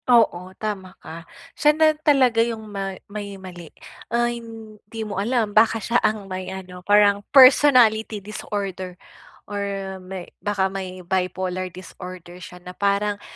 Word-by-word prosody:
Oo, 210 Hz, -7 st, +3 dB
tama 200 Hz, -4 st, -5 dB
ka, 165 Hz, +1 st, -11 dB, 0.2 s
siya 300 Hz, 0 st, +3 dB
na 315 Hz, -1 st, +5 dB
talaga 270 Hz, -6 st, +3 dB
yung 230 Hz, -1 st, -2 dB
ma 195 Hz, -2 st, -5 dB
may 200 Hz, -1 st, -7 dB
mali, 175 Hz, -4 st, -10 dB, 0.4 s
ay 240 Hz, 0 st, 0 dB
hindi 220 Hz, -1 st, -9 dB
mo 200 Hz, -2 st, -3 dB
alam 225 Hz, -1 st, 0 dB
baka 220 Hz, +1 st, +4 dB
siya 235 Hz, +3 st, 0 dB
ang 215 Hz, -2 st, 0 dB
may 185 Hz, -1 st, -6 dB
ano 185 Hz, -1 st, -8 dB
parang 205 Hz, +1 st, +4 dB
personality 255 Hz, -5 st, +6 dB
disorder 195 Hz, -3 st, -5 dB, 0.5 s
or 205 Hz, -1 st, -4 dB, 0.4 s
may 185 Hz, -1 st, -7 dB, 0.2 s
baka 195 Hz, -2 st, -1 dB
may 185 Hz, -2 st, -6 dB
bipolar 185 Hz, 0 st, -2 dB
disorder 180 Hz, 0 st, -11 dB
siya 180 Hz, -, -10 dB
na 180 Hz, -, -8 dB
parang 200 Hz, +1 st, 0 dB
205 Hz, 140 wpm, -22 LUFS, 185-225 Hz, 0.5 s, personality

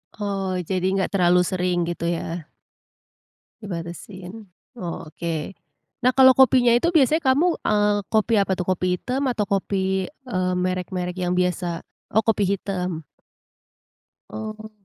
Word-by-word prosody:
Oh, 195 Hz, -3 st, -2 dB
jadi 185 Hz, +1 st, -2 dB
enggak 190 Hz, -, 0 dB
terlalu 180 Hz, -2 st, +4 dB
sering 180 Hz, -1 st, 0 dB
gitu 170 Hz, 0 st, -3 dB
ya. 170 Hz, -1 st, -3 dB, 1.1 s
Dibatasin, 185 Hz, +3 st, -7 dB, 0.3 s
oke. 165 Hz, -1 st, -5 dB, 0.5 s
Nah, 255 Hz, -, +5 dB
kalau 260 Hz, -1 st, +7 dB
kopinya 255 Hz, -2 st, +6 dB
itu 340 Hz, +7 st, 0 dB
biasanya 310 Hz, +2 st, +4 dB
kamu, 335 Hz, +5 st, +2 dB
eee, 205 Hz, 0 st, +3 dB, 0.2 s
kopi 220 Hz, +1 st, +2 dB
apa 195 Hz, -1 st, +2 dB
tuh? 180 Hz, 0 st, -3 dB
Kopi 185 Hz, 0 st, 0 dB, 0.2 s
hitam 265 Hz, +3 st, -1 dB
atau 215 Hz, -6 st, -1 dB
kopi, 190 Hz, -1 st, 0 dB
eee, 185 Hz, -11 st, -3 dB
merek-merek 180 Hz, 0 st, -2 dB
yang 180 Hz, -1 st, 0 dB
biasa. 180 Hz, -1 st, -1 dB, 0.3 s
Oh, 220 Hz, -, +5 dB
kopi 215 Hz, -3 st, +1 dB
hitam. 180 Hz, -4 st, -3 dB, 1.3 s
Oh. 215 Hz, 0 st, -7 dB
190 Hz, 125 wpm, -23 LUFS, 180-215 Hz, 1.3 s, kalau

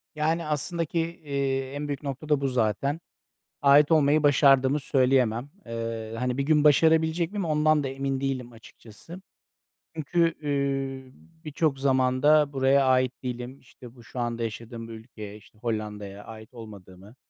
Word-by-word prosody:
Yani, 160 Hz, +2 st, 0 dB
aslında 155 Hz, +3 st, -2 dB
ki, 165 Hz, +2 st, -2 dB, 0.2 s
eee, 135 Hz, -2 st, -2 dB
en 145 Hz, +1 st, -4 dB
büyük 145 Hz, -1 st, -5 dB
nokta 140 Hz, +2 st, -6 dB
da 150 Hz, -2 st, +2 dB
bu 140 Hz, -, 0 dB
zaten. 125 Hz, +4 st, 0 dB, 0.6 s
Ait 145 Hz, +2 st, +6 dB
olmayı 155 Hz, -1 st, +4 dB
başardığımı 140 Hz, -1 st, +4 dB
söyleyemem. 130 Hz, -2 st, +1 dB, 0.2 s
Eee, 115 Hz, -1 st, -5 dB
hani, 125 Hz, +1 st, -2 dB
bir 140 Hz, -, +1 dB
gün 150 Hz, +1 st, +2 dB
başarabilecek 160 Hz, +3 st, +3 dB
miyim 205 Hz, -3 st, -2 dB
ondan 155 Hz, -1 st, +2 dB
da -, -, -2 dB
emin 135 Hz, 0 st, -3 dB
değilim 130 Hz, -3 st, -3 dB
açıkçası. 115 Hz, -, -14 dB, 0.8 s
Çünkü, 165 Hz, +2 st, +1 dB
iii, 135 Hz, -2 st, -2 dB, 0.3 s
birçok 150 Hz, -2 st, -1 dB
zaman 130 Hz, -1 st, +1 dB
da 150 Hz, -1 st, +4 dB
buraya 135 Hz, +1 st, +3 dB
ait 130 Hz, 0 st, +1 dB
değilim, 125 Hz, +1 st, -6 dB
işte, 125 Hz, -1 st, -15 dB
bu 120 Hz, -, -16 dB
şu 125 Hz, -, -9 dB
anda 120 Hz, -1 st, -2 dB
yaşadığım 115 Hz, +1 st, -6 dB
bu -, -, -10 dB
ülkeye, 110 Hz, -2 st, -10 dB
işte, 110 Hz, 0 st, -21 dB
Hollanda'ya 105 Hz, -3 st, -5 dB
ait 110 Hz, +1 st, -12 dB
olmadığımı 100 Hz, -2 st, -13 dB
135 Hz, 155 wpm, -26 LUFS, 120-150 Hz, 0.8 s, Ait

